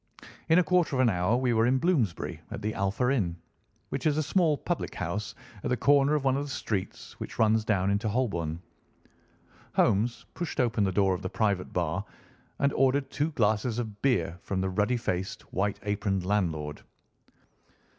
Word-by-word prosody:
In 160 - +6
a 180 - +6
quarter 170 -3 +2
of - - 0
an 125 -3 +4
hour 90 +5 +1
we 125 -1 +1
were 115 +1 +3
in 130 +1 +3
Bloomsbury 135 - 0
at - - -6
the 110 +1 -1
Alpha 110 +5 0
Inn, 90 -10 0 0.5
which 135 +3 -1
is 150 -1 +2
a 155 - +2
small 155 -1 +2
public 175 +3 -3
house 100 +4 -3 0.3
at - - -1
the 125 - +1
corner 140 +4 +4
of 150 - 0
one 135 -1 +3
of 140 - -1
the 145 - -7
streets 105 -7 -4
which - - -7
runs 110 0 +3
down 100 -3 +1
into 105 +2 0
Holborn. 90 -9 -1 1.1
Holmes 110 +4 +2
pushed 175 -3 -4
open 115 -4 +2
the 95 - 0
door 95 0 +3
of 90 - -4
the 95 - -3
private 100 -4 0
bar 90 +2 -1 0.5
and 140 0 +1
ordered 135 +1 +2
two 150 +3 0
glasses 110 0 +1
of 110 -4 -5
beer 90 -10 +1
from 95 - -3
the 95 - 0
ruddy 105 +6 +1
faced, 95 -5 -3
white 100 +2 0
aproned 100 -2 -1
landlord. 80 -7 -1
110 Hz, 185 wpm, -28 LUFS, 95-135 Hz, 1.1 s, In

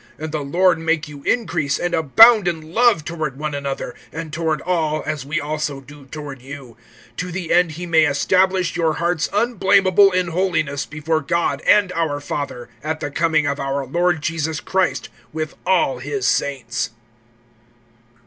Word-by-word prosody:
(12)And 155 0 -5
the 155 -2 -3
Lord 175 +4 +2
make 160 -1 0
you 145 -1 -11
increase 150 - 0
and 175 0 -2
abound 210 - +6
in 160 -1 -4
love 225 -9 +3
toward 155 -4 -4
one 150 0 -4
another, 140 -1 -4 0.2
and 160 -1 -7
toward 160 -1 -1
all, 160 -4 0
as 150 -3 -4
we 155 +3 -1
also 150 -1 -3
do 140 0 -15
toward 140 -2 -8
you; 135 -3 -10 0.4
(13)to 180 0 -4
the 175 -2 -2
end 175 -2 +3
he 175 +4 -6
may 165 -2 +4
establish 185 +5 +1
your 165 -2 +1
hearts 170 0 -1
unblamable 200 -3 +4
in 180 -1 0
holiness 160 -5 -1
before 155 +1 -1
God 170 +4 -1
and 205 -3 +5
our 160 -4 -1
Father, 140 -4 -5 0.2
at 155 +1 -3
the 145 - -4
coming 160 -1 +1
of 140 0 -1
our 135 0 -2
Lord 170 +2 0
Jesus 160 0 -2
Christ 190 -1 -1 0.2
with 155 0 -4
all 175 -9 +2
his 135 -1 -2
saints. 130 -4 -1
160 Hz, 165 wpm, -20 LUFS, 145-175 Hz, 0.4 s, abound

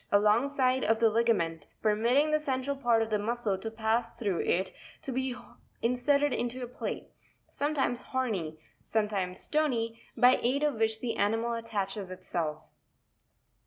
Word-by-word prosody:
98) 205 - +7
alongside 255 +4 +2
of 225 +1 +3
the 225 -1 +4
ligament, 195 -9 +1 0.2
permitting 230 +7 +3
re 310 - -2
the 305 - +3
central 275 -1 -1
part 240 -4 +2
of 220 - -6
the 210 - +2
muscle 225 -1 -1
to 190 +4 -5
pass 225 +1 0
through 200 -7 -1
it 185 +2 0 0.3
to 270 - -4
be 260 0 -1 0.5
inserted 280 +4 +2
into 245 +1 -2
a - - -4
plate, 245 - -5 0.4
sometimes 280 -4 0
horny, 200 -12 -2 0.3
sometimes 200 -4 -1
stony, 235 -7 0 0.2
by 250 +1 +6
aid 270 +5 +1
of 300 -1 +2
which 220 0 +1
the 240 -2 -2
animal 225 +3 +1
attaches 205 -4 -3
itself' 170 -4 -4
Fig. - - -31
230 Hz, 160 wpm, -30 LUFS, 210-255 Hz, 0.5 s, 98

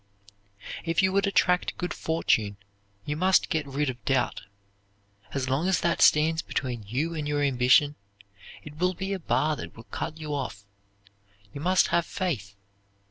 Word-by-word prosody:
If 165 +2 +1
you 190 0 +2
would 200 +1 +2
attract 180 -2 +2
good 180 -2 -3
fortune 110 -11 0 0.5
you 145 - -2
must 185 +4 +3
get 155 -4 0
rid 140 +2 -1
of 125 -2 -5
doubt. 130 -2 0 0.9
As 135 -2 -2
long 135 +7 0
as 190 - +2
that 170 -1 +1
stands 160 +2 +5
between 125 -4 -3
you 145 +10 -1
and 155 -3 -3
your 145 0 0
ambition, 135 +2 +4 0.7
it 150 0 -11
will 180 +2 +1
be 190 +3 -3
a 195 - -3
bar 155 -2 +1
that - - -8
will 115 - -10
cut 155 +6 -5
you 155 -2 -5
off. 125 -8 -4 0.9
You 140 - -7
must 185 +3 +3
have 170 0 +1
faith. 120 - -3
150 Hz, 165 wpm, -27 LUFS, 135-175 Hz, 0.9 s, stands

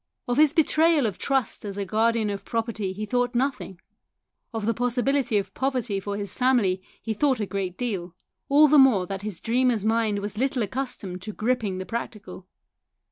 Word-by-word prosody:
Of 245 +1 0
his 305 -1 +6
betrayal 320 -2 +4
of 205 -5 -3
trust 270 -3 0
as 200 -1 -6
a 200 - -2
guardian 220 +1 +1
of 200 - -5
property 225 -4 -2
he 210 +3 -5
thought 245 +2 0
nothing; 250 -8 -2 0.7
of 225 -2 -3
the 230 - +2
possibility 245 +1 +1
of 195 -1 -3
poverty 255 -7 -1
for 200 +1 -4
his 200 -1 -4
family 240 -8 +2 0.2
he 225 - -2
thought 265 +3 +1
a 210 - -1
great 190 -2 -4
deal 185 -8 -3 0.3
all 295 +2 +7
the 295 0 +6
more 240 -9 +5
that 195 +1 -5
his 205 -4 -5
dreamer's 240 -2 +1
mind 220 -2 +1
was 205 +1 -5
little 260 -2 +1
accustomed 205 -5 -5
to 215 +2 -6
gripping 220 -4 -1
the 185 - -5
prac 235 +6 -4
tical. 190 -3 -12
225 Hz, 190 wpm, -25 LUFS, 200-255 Hz, 0.7 s, all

